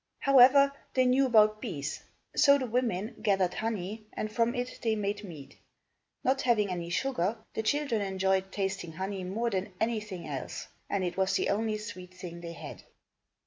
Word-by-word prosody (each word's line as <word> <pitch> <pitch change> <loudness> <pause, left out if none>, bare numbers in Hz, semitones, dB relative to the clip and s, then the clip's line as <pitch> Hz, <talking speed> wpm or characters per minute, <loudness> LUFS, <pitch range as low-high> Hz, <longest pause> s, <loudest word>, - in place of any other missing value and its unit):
However, 275 +1 +7 0.2
they 255 -1 +4
knew 260 +2 +4
about 215 -3 +5
bees. 150 - -4 0.3
So 280 0 +6
the 265 - -2
women 230 -4 -1
gathered 195 -4 +2
honey 215 0 -4
and 215 - -3
from 230 +3 +1
it 245 0 -4
they 225 -2 +1
made 205 0 -2
mead. 160 -8 -10 0.6
Not 270 +1 +2
having 215 -6 +2
any 170 -1 -4
sugar, 215 0 0 0.2
the - - -1
children 275 -2 0
enjoyed 190 -1 0
tasting 195 -4 -3
honey 190 +2 -4
more 225 +6 -1
than 190 0 -2
anything 215 -6 -2
else, 135 -4 -5 0.2
and 200 -2 0
it 175 0 -3
was 190 0 +2
the - - +1
only 215 +1 0
sweet 185 -4 -9
thing 175 -2 -8
they 170 -1 -6
had. - - -9
210 Hz, 170 wpm, -30 LUFS, 185-235 Hz, 0.6 s, However